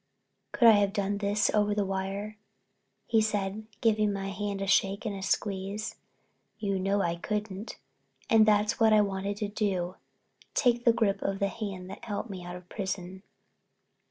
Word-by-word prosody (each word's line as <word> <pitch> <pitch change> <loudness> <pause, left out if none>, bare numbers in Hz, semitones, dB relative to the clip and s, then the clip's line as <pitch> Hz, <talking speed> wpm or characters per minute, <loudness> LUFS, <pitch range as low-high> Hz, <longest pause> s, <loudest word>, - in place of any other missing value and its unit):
"Could 235 - +5
I - - +11
have 205 -2 +3
done 200 -1 -1
this 205 +1 +1
over 210 -1 +2
the 205 -1 +1
wire?" 195 +2 -4 0.7
he 225 -1 +3
said, 210 0 -2
giving 215 -2 +3
my 195 -1 -3
hand 200 +1 -3
a 195 - -2
shake 195 +2 +2
and 210 -2 -2
a 195 - -6
squeeze. 200 +2 -2 0.6
"You 200 -2 -1
know 195 +1 +1
I 170 0 0
couldn't. 210 +3 -4 0.5
And 220 -1 +5
that's 210 +2 +3
what 220 -1 +5
I 215 - +6
wanted 200 0 -2
to 210 -1 -2
do—take 205 +5 -2
a - - +9
grip 215 -4 +1
of 195 0 -1
the 200 0 0
hand 195 -3 -5
that - - -9
helped 205 +1 -4
me 185 -2 -7
out 175 0 -7
of 180 0 -11
prison." 190 -1 -5
200 Hz, 170 wpm, -29 LUFS, 195-215 Hz, 0.7 s, I